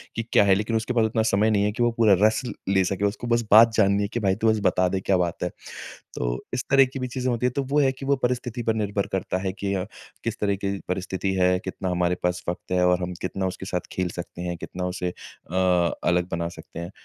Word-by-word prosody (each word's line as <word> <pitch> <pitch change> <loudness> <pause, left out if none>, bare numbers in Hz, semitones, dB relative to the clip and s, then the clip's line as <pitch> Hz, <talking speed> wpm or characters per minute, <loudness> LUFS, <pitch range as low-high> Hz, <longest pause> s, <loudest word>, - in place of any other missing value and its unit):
कि 115 - -2
क्या - - +6
है? 100 -1 +5
लेकिन 110 +3 -1
उसके 110 +3 -1
पास 115 -2 +3
उतना 110 0 0
समय 110 0 +2
नहीं 100 -1 +2
है 105 - +1
कि 120 +3 -1
वो 120 - +3
पूरा 110 -3 +5
रस 110 +2 +4
ल - - -4 0.2
ले 95 - +4
सके, 100 +2 -1
उसको 105 +4 -2
बस 115 0 +2
बात 115 +2 +8
जाननी 100 -2 +3
है - - 0
कि 120 - 0
भई 95 -3 +1
तू 110 +1 +2
बस 110 -1 +2
बता 90 0 +3
दे 95 +1 -1
क्या 95 0 +2
बात 85 -1 -1
है। 90 - 0 0.7
तो - - -2
इस 125 0 -1
तरह 135 -1 +6
की 130 +1 -7
भी 130 - -2
चीज़ें 130 +1 -2
होती 120 +1 -1
हैं। 125 - +1
तो 140 - 0
वो 140 +3 +1
है 135 -2 +4
कि 130 +1 -9
वो 140 +1 +3
परिस्थिति 125 -1 -1
पर 110 -1 +1
निर्भर 105 -2 -1
करता 95 -1 -1
है 95 -1 -1
कि 100 -1 -1
अ, 95 0 -1 0.4
किस 115 +1 -3
तरह 100 -1 +1
की 100 0 -3
परिस्थिति 95 +1 -2
है? 90 0 +3
कितना 95 0 -4
हमारे 90 0 +1
पास 90 0 -1
वक़्त 90 - -6
है? 90 0 +2
और 90 0 +3
हम 90 0 -3
कितना 95 +1 -2
उसके 95 +1 -6
साथ 90 -2 -3
खेल 90 -1 -1
सकते 85 0 -7
हैं? 90 -1 -3
कितना 90 +2 -5
उसे 90 -1 -3
अ, 90 - -14
अलग 90 -1 +1
बना 85 0 -2
सकते - - -10
हैं? 85 +2 -6
100 Hz, 270 wpm, -24 LUFS, 90-115 Hz, 0.7 s, बात